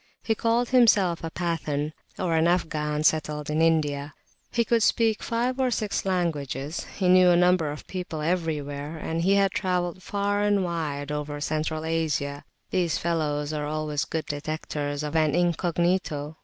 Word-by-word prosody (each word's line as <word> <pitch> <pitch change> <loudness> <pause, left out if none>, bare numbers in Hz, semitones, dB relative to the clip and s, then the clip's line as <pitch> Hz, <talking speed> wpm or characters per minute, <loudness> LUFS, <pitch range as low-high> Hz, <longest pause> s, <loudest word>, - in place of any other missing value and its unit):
He 225 - +1
called 230 +2 +1
himself 210 -10 +4
a 165 - -2
Pathan 155 -3 -2 0.2
(Afghan 160 -3 +1
settled 150 -1 +1
in 155 +1 +1
India); 150 -3 +1 0.4
he 235 -1 +1
could 230 +1 +2
speak 220 0 +2
five 245 +3 -1
or 260 -1 +2
six 215 -5 -1
languages, 155 -5 -2
he 190 - +1
knew 180 0 +6
a 175 - +5
number 180 -3 +3
of 150 - -8
people 180 -4 -5
everywhere, 150 -2 -2
and 165 +1 -3
he 195 +3 +3
had 195 -1 +3
travelled 180 -2 -1
far 205 +1 -1
and 205 -2 +2
wide 150 -4 -3
over 150 0 -3
Central 155 +1 -2
Asia. 150 -3 -1 0.3
These 175 -3 +1
fellows 150 -3 -1
are 150 -1 -2
always 150 -1 -2
good 160 -1 -3
detectors 145 -1 -3
of 150 +1 -4
an 155 -2 +3
incognito. 170 -3 0
165 Hz, 155 wpm, -26 LUFS, 150-185 Hz, 0.4 s, knew